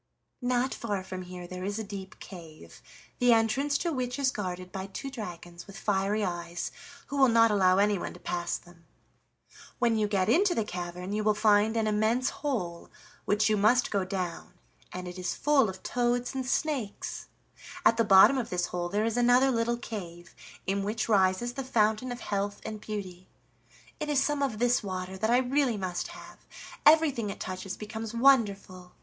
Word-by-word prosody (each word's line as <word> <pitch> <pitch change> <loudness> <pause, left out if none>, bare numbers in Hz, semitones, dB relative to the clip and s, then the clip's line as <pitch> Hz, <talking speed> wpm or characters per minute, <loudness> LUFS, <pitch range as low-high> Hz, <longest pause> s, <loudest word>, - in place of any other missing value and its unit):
"Not 250 +1 0
far 205 -4 -3
from 185 0 -6
here 180 0 -8
there 180 +1 -7
is 200 +2 -2
a 220 - -3
deep 195 -2 -8
cave, 160 - -12 0.4
the 245 -1 +5
entrance 255 +6 +2
to 340 -2 -2
which 250 -1 -2
is 275 -2 +2
guarded 185 -5 -5
by 190 0 -5
two 270 +8 -6
dragons 175 -7 -8
with 200 +1 -11
fiery 205 0 0
eyes, 175 -1 -4 0.3
who 285 - -5
will 270 -1 +6
not 230 -1 +5
allow 185 -2 +4
anyone 205 -1 +1
to - - -12
pass 175 -1 -2
them. 170 -1 -19 0.9
When 235 -2 +2
you 210 - +2
get 195 -3 +1
into 370 +2 +3
the 225 - +1
cavern 180 +1 -5
you 215 0 -1
will 215 0 +3
find 210 +1 +3
an 220 - +1
immense 220 +5 +1
hole, 210 - -3 0.4
which 210 +1 +2
you 215 - +3
must 215 +5 +3
go 200 -2 +1
down, 185 -3 -5 0.4
and 180 0 -6
it 180 +1 -7
is 180 -1 -2
full 280 -7 +3
of 190 0 -9
toads 245 0 0
and 260 -1 -3
snakes; 265 -7 -2 0.6
at 230 - +5
the 230 - +4
bottom 205 +6 +7
of 240 - -4
this 180 -1 0
hole 175 -1 -2
there 210 +4 0
is 230 +1 -1
another 245 +2 +4
little 235 0 0
cave, 175 -7 -8 0.3
in 195 +1 0
which 215 +2 -2
rises 200 +3 +2
the 270 - -4
Fountain 220 0 +1
of 245 -1 -6
Health 200 0 -2
and 215 -1 -6
Beauty. 185 -4 -7 0.7
It 300 -1 -3
is 290 -2 +3
some 290 +1 0
of 265 -6 -1
this 245 +2 +2
water 185 -2 -5
that 220 +2 0
I 240 - +5
really 260 -2 +1
must 185 -2 -3
have: 350 +1 -12 0.5
everything 300 -8 +4
it - - -6
touches 185 0 -5
becomes 220 +1 -6
wonderful. 200 -8 +2
210 Hz, 185 wpm, -29 LUFS, 185-245 Hz, 0.9 s, bottom